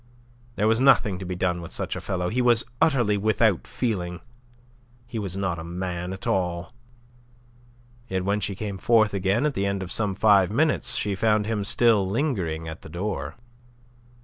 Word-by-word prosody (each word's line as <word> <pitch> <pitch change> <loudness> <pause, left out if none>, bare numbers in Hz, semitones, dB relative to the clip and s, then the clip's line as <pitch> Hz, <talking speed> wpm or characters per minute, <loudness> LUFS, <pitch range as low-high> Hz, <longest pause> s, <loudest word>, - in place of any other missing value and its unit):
There 105 - +1
was 110 +1 +3
nothing 110 -8 +4
to 95 - -6
be 90 0 -4
done 90 -1 -1
with 85 - -9
such - - -3
a - - -5
fellow. 90 -2 -2
He 125 +3 0
was 120 -2 +3 0.2
utterly 120 -9 +3
without 110 -1 +1
feeling. 90 -8 -3 0.9
He 115 - -5
was 95 -3 -4
not 95 -4 -2
a - - -6
man 90 +1 -4
at 95 0 -7
all. 90 +2 -1 1.3
Yet 95 -3 -2
when 100 +1 +1
she 100 -1 -3
came 100 -1 -5
forth 110 -1 +3
again 100 +7 +1
at 150 - +1
the 100 -5 -1
end 100 -1 -2
of 90 - -6
some 105 -3 0
five 100 -2 +4
minutes, 145 +8 +2
she 105 - 0
found 105 +1 +1
him 105 -2 -1
still 105 -2 +3
lingering 95 - -2
at 80 0 -7
the - - -11
door. 95 +6 -4
100 Hz, 180 wpm, -25 LUFS, 90-110 Hz, 1.3 s, nothing